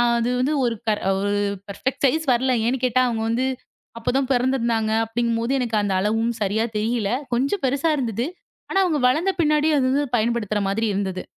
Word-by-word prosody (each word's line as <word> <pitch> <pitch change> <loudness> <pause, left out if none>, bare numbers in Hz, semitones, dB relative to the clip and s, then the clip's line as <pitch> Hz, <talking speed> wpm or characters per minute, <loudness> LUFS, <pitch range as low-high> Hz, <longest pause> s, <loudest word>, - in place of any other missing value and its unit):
அது 235 0 +2
வந்து 260 +4 +1
ஒரு 235 -1 +1
ப - - +2 0.8
ப்ரபிக்ட் 255 +6 -4
சைஸ் 315 +4 +2
வரலை. 255 +1 +2
ஏன்னு 255 +1 -1
கேட்டா 255 0 +2
அவங்க 230 -2 -1
வந்து 240 +3 0 0.5
அப்பதான் 260 +3 0
பிறந்திருந்தாங்க 235 -3 +1
அப்படிங்கும்போது 230 +1 -1
எனக்கு 235 -3 -1
அந்த 200 -1 -1
அளவும் 225 +4 0
சரியா 210 +3 +1
தெரியல. 215 -1 0 0.2
கொஞ்சம் 275 +10 0
பெருசா 280 +5 +1
இருந்தது. 235 -3 -2 0.4
ஆனா 390 - +1
அவங்க 325 -5 +1
வளர்ந்த 320 +9 +1
பின்னாடி 305 -1 +3
அது 270 - +2
வந்து 285 +2 +1
பயன்படுத்துற 220 -2 0
மாதிரி 220 +3 0
இருந்தது. 190 -2 -2
240 Hz, 165 wpm, -22 LUFS, 225-265 Hz, 0.8 s, பின்னாடி